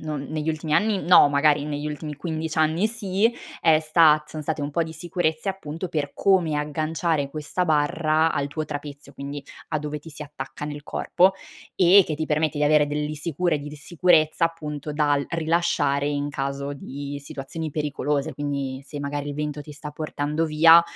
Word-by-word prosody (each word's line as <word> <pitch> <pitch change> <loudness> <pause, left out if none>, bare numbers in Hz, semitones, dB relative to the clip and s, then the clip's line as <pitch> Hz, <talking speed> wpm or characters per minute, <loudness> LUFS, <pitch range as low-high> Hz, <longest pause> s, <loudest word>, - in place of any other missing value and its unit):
non 150 -3 -4
negli 155 0 -3
ultimi 155 -1 -2
anni, 210 0 +2
no, 175 -4 +7
magari, 145 0 +3
negli 150 0 -3
ultimi 150 0 -5
15 160 +1 -4
anni 160 +5 +3
sì, 220 0 0 0.3
è 160 -2 +5
stat 155 -1 +4
sono 155 -1 -6
state 150 0 -2
un 145 - -2
po' 170 +3 +1
di 160 0 -6
sicurezze, 165 +1 -2
appunto, 185 -2 -4
per 150 -3 -2
come 180 -6 +2
agganciare 155 0 -1
questa 155 +5 -2
barra 155 0 +2
al 145 -2 -1
tuo 155 +2 -3
trapezio, 145 -1 -7
quindi, 140 0 -7 0.2
a 155 - -1
dove 150 0 -4
ti 155 +3 -13
si 150 0 -8
attacca 140 -1 -7
nel 145 0 -6
corpo, 185 +5 +2 0.4
e 185 +1 +7
che 155 - -2
ti 155 +1 -2
permette 155 0 0
di 150 - +2
avere 150 0 +4
delle 150 +1 -2
sicure 165 +1 -1
di 145 +1 -7
di 150 - -9
sicurezza, 165 0 +2
appunto, 150 -3 -4
dal 145 -1 +2
rilasciare 160 -4 +1
in 145 0 -1
caso 140 0 -3
di 140 +1 -6
situazioni 155 +4 -6
pericolose. 150 0 -1
Quindi, 140 -2 -3
se 145 - -6
magari 145 0 -3
il 145 - -4
vento 150 0 -3
ti 150 +1 -10
sta 150 +1 -8
portando 150 +1 -2
via, 165 +2 +7
150 Hz, 185 wpm, -24 LUFS, 145-160 Hz, 0.4 s, no